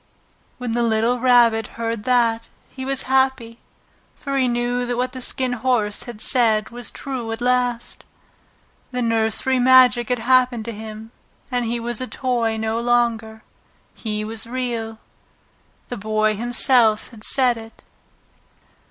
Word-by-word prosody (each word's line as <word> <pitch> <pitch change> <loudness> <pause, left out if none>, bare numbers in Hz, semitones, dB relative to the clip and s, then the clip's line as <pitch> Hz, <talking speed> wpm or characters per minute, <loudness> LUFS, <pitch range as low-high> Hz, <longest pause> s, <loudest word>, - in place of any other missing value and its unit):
When 245 -2 -4
the 240 - 0
little 230 +2 +1
Rabbit 235 -3 +4
heard 230 -2 -3
that 230 -2 +1 0.2
he 260 -1 -7
was 270 0 -1
happy, 265 -3 0 0.6
for 275 -1 -5
he 260 -2 +2
knew 240 +1 0
that 245 0 -2
what 250 +1 -1
the 255 - -8
Skin 255 0 -1
Horse 230 -4 -1
had 240 -3 -9
said 220 -4 +2
was 240 -1 -7
true 255 -5 -5
at 225 - -4
last. 245 -1 -1 0.9
The 250 -1 -2
nursery 230 +3 +1
magic 250 -2 +5
had 250 - +1
happened 250 -1 +2
to 235 - -4
him, 220 +1 -9 0.4
and 245 -1 0
he 235 +1 -2
was 240 0 -3
a 255 - -3
toy 235 -4 -1
no 220 +1 -1
longer. 235 -2 0 0.5
He 215 -1 -4
was 225 +1 -4
Real. 235 -3 -3 0.9
The 245 - -4
Boy 215 +1 0
himself 235 -1 +2
had 225 -3 -14
said 255 -1 +2
it. 225 0 -12
240 Hz, 145 wpm, -21 LUFS, 225-250 Hz, 0.9 s, magic